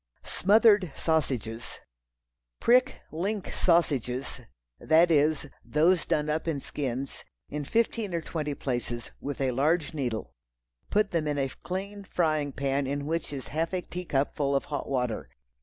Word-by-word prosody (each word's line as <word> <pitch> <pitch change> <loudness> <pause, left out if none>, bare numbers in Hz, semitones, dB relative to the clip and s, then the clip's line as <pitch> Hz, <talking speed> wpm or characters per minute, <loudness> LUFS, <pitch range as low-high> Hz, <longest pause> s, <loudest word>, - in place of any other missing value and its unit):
Smothered 205 - +4
Sausages. 130 -8 -1 0.8
Prick 255 +2 +4
"link" 195 +5 -2
sausages—that 135 - +1
is, 150 0 +3 0.2
those 165 +4 +3
done 150 0 +1
up 155 +2 -1
in 155 -4 0
skins, 135 -1 -4 0.3
in 150 0 -3
fifteen 225 +2 0
or 170 - 0
twenty 150 -3 -3
places, 120 -3 -3
with 145 0 -4
a 135 -2 +1
large 155 +6 +1
needle; 125 -7 -3 0.6
put 210 0 +2
them 165 -4 0
in 145 -1 0
a 135 -1 0
clean 200 +7 -5
frying 155 -6 0
pan 135 0 -1
in 140 +1 -2
which 165 0 -2
is 135 -3 -6
a - - -13
half 165 +4 -1
a 180 - -1
teacup 155 -6 -1
full 140 -1 +1
of 135 - +1
hot 145 - -3
water. 125 - -1
150 Hz, 145 wpm, -28 LUFS, 135-175 Hz, 0.8 s, Smothered